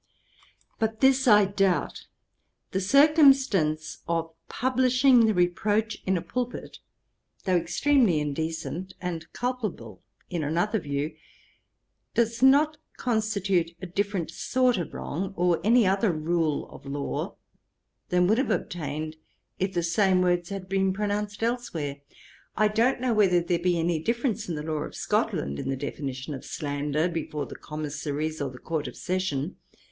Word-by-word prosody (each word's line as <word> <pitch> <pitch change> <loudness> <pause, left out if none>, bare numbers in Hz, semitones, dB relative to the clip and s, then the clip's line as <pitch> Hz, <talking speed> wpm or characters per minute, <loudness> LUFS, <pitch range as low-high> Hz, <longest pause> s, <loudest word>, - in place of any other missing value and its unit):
But 220 0 -1
this 265 0 +4
I 210 -3 +7
doubt. 195 -2 0 0.6
The 190 - -1
circumstance 270 - +4
of 165 -1 -1 0.2
publishing 255 -1 +4
the 220 - +3
reproach 205 +5 +1
in 190 0 +2
a 170 - -4
pulpit, 245 +7 -4 0.7
though 185 -2 +2
extremely 180 - +3
indecent, 160 +4 -4
and 170 -3 -5
culpable 215 - -4 0.3
in 170 -3 -3
another 175 +9 0
view, 145 0 -3 1.0
does 230 0 +1
not 290 +4 +5 0.2
constitute 200 -7 0
a - - -6
different 190 -2 -2
sort 250 +5 +1
of 170 - -4
wrong, 190 +6 -4
or 175 -1 +2
any 230 +2 +5
other 195 +2 +2
rule 160 -1 0
of - - -12
law, 140 0 -3 0.7
than 180 0 +3
would 215 +6 +3
have 270 - 0
obtained, 155 -1 -3 0.4
if 190 +1 0
the 175 - +1
same 185 +2 +3
words 175 -1 +1
had 195 -2 -6
been 190 0 +1
pronounced 210 +1 -2
elsewhere. 175 - -2 0.6
I 215 0 +4
don't 235 +4 +2
know 255 -2 +1
whether 195 -5 +4
there 170 0 0
be 175 0 +1
any 165 0 +1
difference 235 - -1
in 170 - -2
the 150 - -4
law 155 -1 -2
of - - -6
Scotland, 70 +2 -1
in - - -3
the 135 - -1
definition 135 0 -5
of 135 - -7
slander, 145 +2 -1
before 160 -3 -3
the - - -9
Commissaries, 150 0 -4
or 140 - -1
the 130 - -11
Court 155 +3 -3
of - - -9
Session. 180 -4 -2
180 Hz, 145 wpm, -27 LUFS, 160-220 Hz, 1.0 s, I